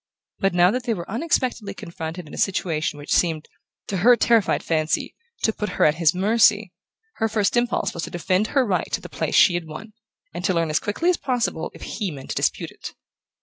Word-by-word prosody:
But 195 -2 +1
now 175 +1 +5
that 250 +2 -3
they 230 -3 0
were 170 -2 -7
unexpectedly 235 -5 -1
confronted 170 0 -7
in - - -13
a - - -7
situation 160 -6 -1
which 145 0 -3
seemed, 160 -3 +1 0.4
to 195 - -3
her 240 +7 +6
terrified 230 -4 +2
fancy, 155 -1 -1 0.3
to 220 - +2
put 210 -4 -4
her - - +4
at 150 - +5
his 160 0 +4
mercy, 210 +4 +3 0.4
her 225 - 0
first 210 0 +1
impulse 240 0 0
was 170 - -5
to - - -8
defend 185 +4 0
her 270 0 +2
right 190 -5 -1
to - - +1
the - - -10
place - - -2
she 180 - +6
had 175 -2 -3
won, 210 +8 -9 0.4
and 175 - -6
to 185 - +1
learn 165 -2 0
as 155 - +2
quickly 330 +13 0
as 355 - -1
possible 250 -2 -2
if - - -11
he 205 -4 -3
meant 140 -5 -8
to - - -3
dispute - - -1
it. - - -10
190 Hz, 220 wpm, -23 LUFS, 170-225 Hz, 0.4 s, her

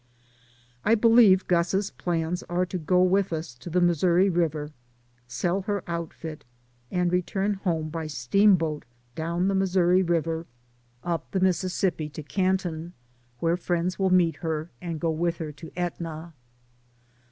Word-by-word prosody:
I 225 - +4
believe 225 -4 +6
Gus's 185 +3 +1
plans 170 0 -2
are 175 +1 +1
to 180 0 -4
go 180 +3 +3
on 185 - +3
with 195 -1 +2
us 160 -4 -4
to 175 - -8
the 180 +2 +1
Missouri 175 +2 +3
River, 155 -3 -1 0.6
sell 175 +10 -1
her 200 -2 -1
outfit, 165 -2 -6 0.5
and 180 -1 0
re 180 0 +3
turn 195 +3 -1
home 170 -5 -2
by 160 0 -4
steamboat 160 - +2 0.3
down 170 +5 -1
the 195 - +1
Missouri 185 -1 +3
River, 165 -2 -1 0.6
up 170 -1 -3
the 190 - -1
Mississippi 185 -3 0
to 155 +1 -8
Canton, 180 -1 -1 0.5
where 165 +1 +2
friends 175 0 -2
will 190 -1 +2
meet 175 -4 +3
her 160 +1 -3
and 170 -3 -4
go 165 0 0
with 170 +1 -1
her 155 -2 -5
to 155 +3 -11
Etna. 170 -2 -4
175 Hz, 150 wpm, -26 LUFS, 160-185 Hz, 0.6 s, believe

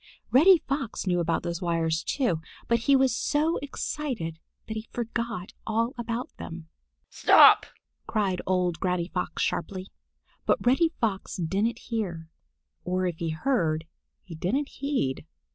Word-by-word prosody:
Reddy 350 +8 +8
Fox 275 -7 -2
knew 180 -2 +1
about 165 -1 0
those 170 -1 -3
wires, 165 -2 0
too, 190 - 0 0.3
but 235 0 +3
he 275 +5 +4
was 265 -2 +3
so 310 +6 +1
excited 260 - -4 0.3
that 220 - -4
he 220 +1 -5
forgot 230 -4 -4
all 230 +3 0
about 235 0 -4
them. 165 -1 -8 0.4
"Stop!" - - +7 0.4
cried 195 -4 0
old 180 -3 +1
Granny 180 -2 0
Fox 180 - -2
sharply. 185 +1 -3 0.6
But - - +2
Reddy 270 +7 +4
Fox 210 -5 -1
didn't 195 +7 0
hear, 185 -10 -4 0.5
or 185 +1 0
if 175 -3 -2
he 165 - -1
heard 160 -4 0 0.4
he 175 - -10
didn't 230 - -1
heed. 255 - -2
195 Hz, 140 wpm, -27 LUFS, 170-245 Hz, 0.6 s, Reddy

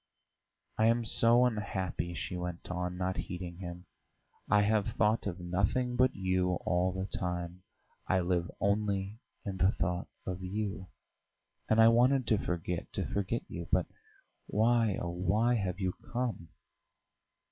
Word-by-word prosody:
"I 110 - +5
am 115 0 +2
so 115 +2 +5
unhappy," 95 -6 -2
she 90 - -4
went 90 0 -5
on, 90 0 -3
not 95 0 -1
heeding 90 -1 -5
him. 90 -1 -7 0.6
"I 105 0 +5
have 105 -1 +2
thought 105 +2 +1
of 90 -1 -4
nothing 100 +8 0
but 130 +1 +3
you 95 -1 +1
all 90 +1 +2
the 95 +1 -3
time; 90 -2 -4 0.5
I 95 0 +3
live 85 -1 0
only 100 0 0 0.3
in 95 -2 -3
the 90 +1 +4
thought 90 -2 -2 0.2
of 90 0 -4
you. 95 0 -3 0.8
And 110 - +4
I 110 0 +8
wanted 125 +3 +4
to 110 - +3
forget, 90 0 -3
to - - -1
forget 100 +4 -1
you; 85 0 -6
but 90 -2 +3 0.6
why, 115 -1 +3
oh, 85 - -3
why, 100 +7 +2
have 95 -5 -1
you 95 -2 0 0.2
come?" 120 -9 -2
95 Hz, 145 wpm, -32 LUFS, 90-110 Hz, 0.8 s, I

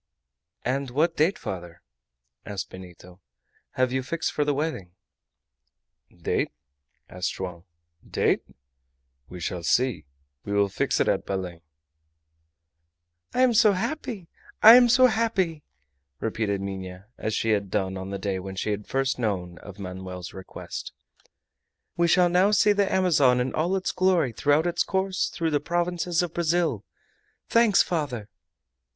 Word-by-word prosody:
"And 135 +1 -1
what 160 +7 +1
date, 165 +7 +2
father," 85 -3 -7 0.6
asked 100 -2 -6
Benito, 90 0 -13 0.5
"have 130 -1 +1
you 130 - 0
fixed 160 +5 -2
for 150 - 0
the 145 - +1
wedding?" 125 - -3 1.2
"Date?" - - -2 0.6
answered 90 0 -3
Joam. 90 -2 -6 0.5
"Date? - - +1 0.9
We 90 - -8
shall 85 +1 -3
see. 120 -1 +1 0.4
We 100 - -4
will 100 -1 +3
fix - - 0
it - - +2
at - - 0
Belem." 90 -3 -4 1.7
"I 250 - +3
am 250 -2 +4
so 215 -2 +5
happy! 200 - -4 0.4
I 225 - +12
am 245 0 +7
so 255 +2 +6
happy!" 195 -9 +1 0.6
repeated 110 -3 -1
Minha, 95 -1 -6
as 110 0 -2
she 115 - 0
had 100 -2 0
done 95 -1 -1
on 95 0 -6
the 100 - -3
day 95 -1 -2
when 95 +1 -7
she 105 - -2
had 105 0 -4
first 135 -1 0
known 90 -6 -2
of 100 -1 -11
Manoel's 90 -2 -7
request. 95 -1 -8 1.0
"We 170 0 +2
shall 180 +1 +5
now 180 +3 +3
see 210 0 +4
the 200 -1 +1
Amazon 145 -9 +4
in 125 +1 -1
all 170 +5 0
its 190 - -1
glory 185 -8 +2
throughout 145 +7 +2
its 175 0 0
course 190 0 0
through 165 -1 -2
the 145 - +2
provinces 175 +2 0
of 170 -2 -4
Brazil! 170 0 0 0.7
Thanks, 230 -4 +5
father!" 135 - -3
130 Hz, 145 wpm, -26 LUFS, -, 1.7 s, I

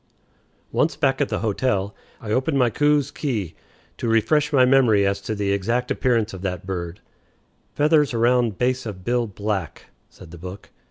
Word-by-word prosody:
Once 160 - +1
back 135 -2 +1
at 145 - +1
the - - -2
hotel, 105 -2 -1 0.3
I 105 - -6
opened 130 +5 +1
my 125 -3 +3
Coues's 145 +1 +2
Key 110 - -3 0.4
to - - -3
refresh 145 +7 +2
my 130 -3 +5
memory 125 -6 +4
as 100 0 0
to 110 +2 -4
the 100 -1 -1
exact 115 +6 -1
appearance 115 -4 +1
of 95 - -8
that 90 -2 -4
bird. 90 0 -5 0.7
"Feathers 150 -1 +3
around 120 -3 +2
base 130 0 0
of 95 -4 -8
bill 120 -1 +1
black," 100 -3 -4 0.2
said 85 -3 -15
the 85 - -11
book. 90 +3 -9
115 Hz, 170 wpm, -22 LUFS, 100-130 Hz, 0.7 s, my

